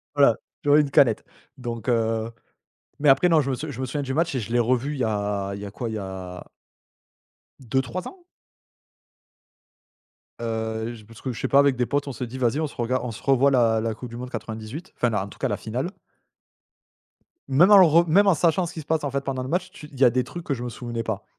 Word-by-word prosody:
voilà - - +5 0.3
j'aurais 145 +1 +5
une 145 - -2
canette 120 -5 +4 0.3
donc 120 -2 -5
heu, 115 -1 0 0.7
mais 145 - +2
après 135 +6 +6
non, 160 -2 +5
je 135 -1 -1
me - - 0
s 150 - -5
je 130 - -7
me 130 - -1
souviens 145 +3 -3
du 135 -1 -3
match 165 +1 0
et 130 - 0
je 115 +1 -6
l'ai 120 - +3
revu 125 +4 +1
il 145 - -5
y - - +2
a 100 -2 -1
il 100 - -7
y - - -6
a - - -7
quoi? 115 +4 -5
Il 110 - -4
y - - -3
a 95 -2 -7 1.2
2-3 130 +7 -2
ans? 370 -2 -13 2.2
Heu, 110 0 -3
je 110 -2 -14
parce 115 +1 -15
que 130 - -3
je 110 - -7
sais - - -1
pas 140 - +5
avec 140 -2 +4
des 125 - +1
potes 145 +3 -1
on - - -3
s'est 125 -1 -5
dit: 125 +3 -8
«Vas-y 125 +2 +1
on 155 - 0
se - - -14
regarde 125 +2 -1
on 120 - -3
se 110 - -11
revoit 135 0 +4
la 115 -4 +3
la 110 0 -1
coupe 120 +3 -9
du 115 - -8
monde 125 +1 -6
98 115 - -7
enfin, 120 - +2
la 105 -4 -1
en 100 - -8
tout - - -15
cas - - 0
la 105 - -1
finale». 125 - -4 1.6
Même 145 +8 +5
en 205 - +10
le 190 - +9
re 170 +2 +4
même 195 +6 +5
en 195 - +6
sachant 170 +3 +2
ce 170 - -7
qui 160 - -6
se - - -15
passe, 160 -1 0
en 145 - -2
fait, 140 +1 -1
pendant 135 -2 -3
le 130 - -6
match 180 +3 -1
tu 155 -6 -11
il 135 - -12
y - - +5
a 125 - +8
des 125 +2 0
trucs 170 +7 -8
que 145 - -1
je 120 - -6
me 125 - -3
souvenais 120 0 -5
pas. 110 -4 -4
125 Hz, 260 wpm, -24 LUFS, 115-145 Hz, 2.2 s, en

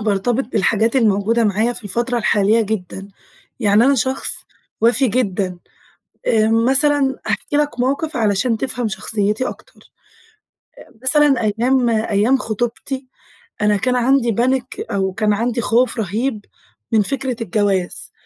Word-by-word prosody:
بارتبط 220 +5 0
بالحاجات 220 +4 +1
الموجودة 225 0 +2
معايا 215 +3 +1
في 235 - -8
الفترة 240 +4 -1
الحالية 210 +1 +2
جدًا. 195 -2 -5 0.5
يعني 210 +1 +4
أنا 280 - +4
شخص 260 +1 0 0.5
وَفي 245 +3 +3
جدًا، 195 -6 -1 0.7
آآ 220 -1 +3
مثلًا 270 +4 +2
هاحكي 290 - -1
لك 295 -5 -1
موقِف 280 +4 -1
علشان 220 +2 +1
تفهَم 250 -2 -2
شخصيتي 210 +3 -1
أكتر. - - -15 0.9
آآ - - -16
مثلًا 280 0 +4
أيام 240 +4 +1
أيام 220 +3 +2
خطوبتي، 240 +4 -4 0.6
أنا 210 0 +3
كان 250 +4 0
عندي 245 -1 +2
panic 255 +1 -1
أو 190 -1 0
كان 210 +1 +1
عندي 235 +3 -1
خوف 235 +2 +1
رهيب 220 +2 -2 0.5
من 220 -2 +4
فكرة 260 +3 -2
الجواز، 205 -5 -1
230 Hz, 130 wpm, -19 LUFS, 210-255 Hz, 0.9 s, يعني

